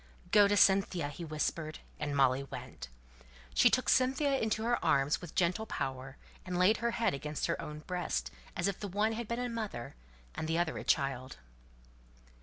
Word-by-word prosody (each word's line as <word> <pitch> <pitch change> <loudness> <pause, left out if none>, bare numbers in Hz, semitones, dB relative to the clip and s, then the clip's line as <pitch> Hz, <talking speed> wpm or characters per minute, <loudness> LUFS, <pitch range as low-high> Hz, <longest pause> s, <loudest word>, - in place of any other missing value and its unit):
"Go 205 -1 +7
to 205 0 +2
Cynthia!" 190 -6 +4
he 160 +4 -8
whispered, 155 0 -2 0.2
and 145 -1 -2
Molly 135 -1 +4
went. 140 - -8 0.7
She 245 - +6
took 255 +2 +1
Cynthia 270 +2 +3
into 220 0 0
her 240 0 0
arms 140 +2 +2
with 175 -3 -10
gentle 185 +5 +1
power, 135 -3 -4 0.3
and 180 -1 -3
laid 185 +5 +4
her 235 - 0
head 230 - +2
against 150 +2 -3
her - - -1
own 150 0 -7
breast, 165 - -3 0.2
as 175 - 0
if 200 - -2
the 205 - -4
one 205 +4 +1
had 225 0 -4
been 235 - -2
a 245 0 -1
mother, 215 - -5 0.4
and 155 - -4
the 165 +1 0
other 170 -2 0
a - - -6
child. 135 -3 0
175 Hz, 185 wpm, -32 LUFS, 145-220 Hz, 0.7 s, Go